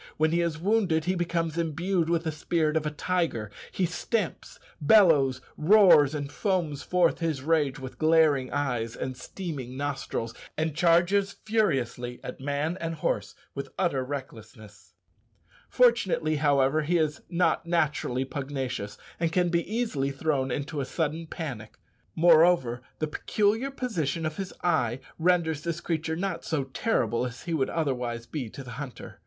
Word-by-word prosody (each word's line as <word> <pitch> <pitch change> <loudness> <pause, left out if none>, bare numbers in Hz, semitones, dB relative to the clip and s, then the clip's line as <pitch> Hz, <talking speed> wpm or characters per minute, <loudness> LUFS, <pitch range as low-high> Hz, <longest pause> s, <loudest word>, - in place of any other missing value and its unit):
When 155 0 +2
he 170 +1 +2
is 170 -3 -1
wounded 180 -3 +1
he 185 - +1
becomes 170 -2 -1
imbued 170 +2 0
with 170 -1 +1
the 160 - -1
spirit 155 0 0
of 155 -1 +1
a - - +1
tiger: 150 - -1 0.2
he 185 - 0
stamps, 185 +3 -3 0.2
bellows, 145 -8 +5 0.2
roars, 155 -5 +6
and 145 -1 -4
foams 170 -6 -1
forth 180 -2 +2
his 160 -6 -2
rage 150 -3 +1
with 130 -1 -9
glaring 155 -5 +3
eyes 125 -5 -1
and 130 0 -4
steaming 130 -3 -6
nostrils, 135 -5 -3 0.2
and 155 -1 -1
charges 175 +4 +3
furiously 130 - 0
at - - -7
man 145 +6 -2
and 165 0 -2
horse 105 -9 -2 0.2
with 140 - -5
utter 155 -8 +1
recklessness. 110 -8 -9 0.7
Fortunately, 195 -11 +3
however, 145 0 +3
he 170 +4 +1
is 155 -2 0
not 175 -1 +1
naturally 150 -6 0
pugnacious, 130 -7 -4 0.2
and 165 -1 +1
can 180 0 +2
be 170 0 +1
easily 220 - 0
thrown 140 -1 -1
into 145 +3 -3
a - - -2
sudden 160 +2 -2
panic. 130 -11 -6 0.4
Moreover, 160 -7 +5 0.2
the 155 - -1
peculiar 210 - 0
position 170 - -2
of 155 0 -3
his 195 -2 -4
eye 130 -8 +1 0.2
renders 165 -3 +2
this 170 0 -3
creature 160 -1 -2
not 175 -1 -3
so 155 -4 -1
terrible 130 - 0
as 125 -1 -5
he 170 - -3
would 135 -5 +1
otherwise 125 -7 -2
be 130 -2 -5
to 135 - -9
the 125 - -9
hunter. 135 -4 -9
155 Hz, 155 wpm, -27 LUFS, 135-170 Hz, 0.7 s, roars